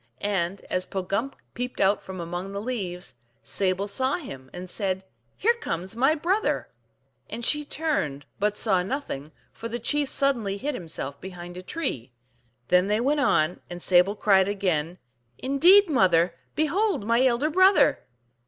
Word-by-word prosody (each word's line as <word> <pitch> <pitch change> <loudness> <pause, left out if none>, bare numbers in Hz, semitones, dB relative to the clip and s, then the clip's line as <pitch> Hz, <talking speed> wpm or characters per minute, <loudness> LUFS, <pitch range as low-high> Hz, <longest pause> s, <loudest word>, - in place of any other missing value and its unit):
And 190 0 -1
as 185 0 -1
Pogumk 200 +7 -2 0.2
peeped 250 +1 -5
out 195 +2 +3
from 190 -1 -8
among 175 +3 -5
the 200 - -3
leaves, 195 -6 -4 0.3
Sable 190 0 -1
saw 260 +6 0
him, 135 - -8
and 180 +1 -8
said, 190 0 -2 0.2
" 115 - -43
Here 465 +4 +3
comes 190 - -4
my 270 +6 +3
brother! 370 +7 0 0.3
" - - -44
And 235 - -4
she 295 +3 +3
turned, 275 - -2
but 210 +1 0
saw 190 -5 +3
nothing, 180 - -4 0.2
for 230 - -7
the 230 +1 -4
chief 285 +4 0
suddenly 235 -8 +1
hid 290 +7 -3
himself 160 - -5
behind 175 -1 -8
a 180 - -6
tree. 140 - -4 0.6
Then 180 +1 +4
they 210 +1 +1
went 285 +5 +1
on, 170 - +2
and 175 0 -7
Sable 180 +3 +3
cried 195 -2 +4
again, 180 -5 -1 0.2
" 120 0 -43
Indeed, 350 +10 +5
mother, 180 - +3
I - - -35 0.2
behold 345 - +1
my 230 +3 +3
elder 260 +4 +2
brother! 375 +3 +5
200 Hz, 165 wpm, -26 LUFS, 180-275 Hz, 0.6 s, Indeed